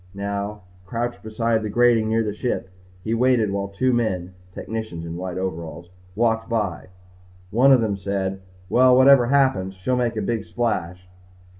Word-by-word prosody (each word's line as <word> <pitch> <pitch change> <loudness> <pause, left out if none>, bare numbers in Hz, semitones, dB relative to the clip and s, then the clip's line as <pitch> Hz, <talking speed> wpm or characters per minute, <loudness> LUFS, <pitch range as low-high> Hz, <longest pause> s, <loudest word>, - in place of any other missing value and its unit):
Now, 100 +1 -4 0.2
crouched 120 +4 -4
beside 110 +1 -1
the 110 - -4
grating 115 0 +3
near 115 0 +2
the 105 -2 -3
ship, 105 -4 -3 0.3
he 110 - -2
waited 120 -3 +2
while 100 0 -2
two 125 +6 0
men 95 -6 -1 0.2
technicians 110 -5 -6
in 85 0 -6
white 90 0 -5
overalls 85 -2 -5 0.2
walked 115 0 0
by. 100 -11 -2 0.6
One 130 +6 +5
of 130 -3 +6
them 105 -3 0
said, 95 0 -3 0.3
"Well, 125 +5 +5
whatever 130 -2 +6
happens, 130 -9 +2
she'll 95 +8 -1
make 120 -2 0
a - - 0
big 115 0 -2
splash." 90 -7 -3
110 Hz, 160 wpm, -22 LUFS, 95-120 Hz, 0.6 s, of